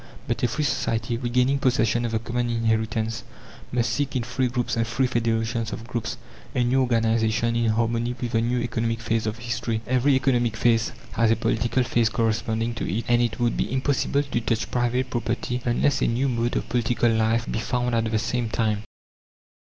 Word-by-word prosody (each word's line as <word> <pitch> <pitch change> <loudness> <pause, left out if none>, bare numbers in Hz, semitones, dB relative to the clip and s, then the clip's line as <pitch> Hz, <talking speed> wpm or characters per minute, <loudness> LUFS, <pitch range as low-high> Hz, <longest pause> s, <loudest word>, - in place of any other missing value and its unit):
But - - -1
a - - +3
free 150 +6 -2
society, 115 -4 0
regaining 125 +3 +1
possession 120 -3 +2
of 115 - -2
the - - +3
common 120 +2 -2
inheritance, 110 -1 0 0.5
must 120 -2 +1
seek 140 +4 -1
in 125 - 0
free 125 +2 0
groups 120 -1 -1
and 115 -1 0
free 130 +3 +1
federations 115 -1 0
of 115 - -6
groups, 120 -3 -3 0.4
a 125 - +2
new 130 +2 +2
organization, 115 -1 +1
in 115 -1 +2
harmony 115 +2 0
with 120 -2 -3
the 115 -1 +2
new 120 +2 0
economic 115 -1 -1
phase 115 -1 -1
of 110 +1 -2
history. 115 -1 -2
Every 130 +3 +3
economic 120 -4 +1
phase 115 0 +2 0.2
has 115 -1 +2
a 115 - +4
political 120 +2 +1
phase 115 -2 +2
corresponding 115 +1 0
to 115 - -3
it, 110 +5 -2
and 120 0 +4
it 120 -1 -1
would 120 -1 +1
be - - -1
impossible 140 +2 +1
to 130 -4 -2
touch 115 0 -1
private 125 +1 0
property 125 +1 -2
unless 130 +2 +2
a - - +3
new 125 +4 +1
mode 120 -1 0
of - - -1
political 120 0 +1
life 115 +1 +2
be - - -2
found 125 +1 -1
at 115 -1 +1
the 110 - +1
same 120 +1 -1
time. 110 -2 0
120 Hz, 195 wpm, -24 LUFS, 115-125 Hz, 0.5 s, a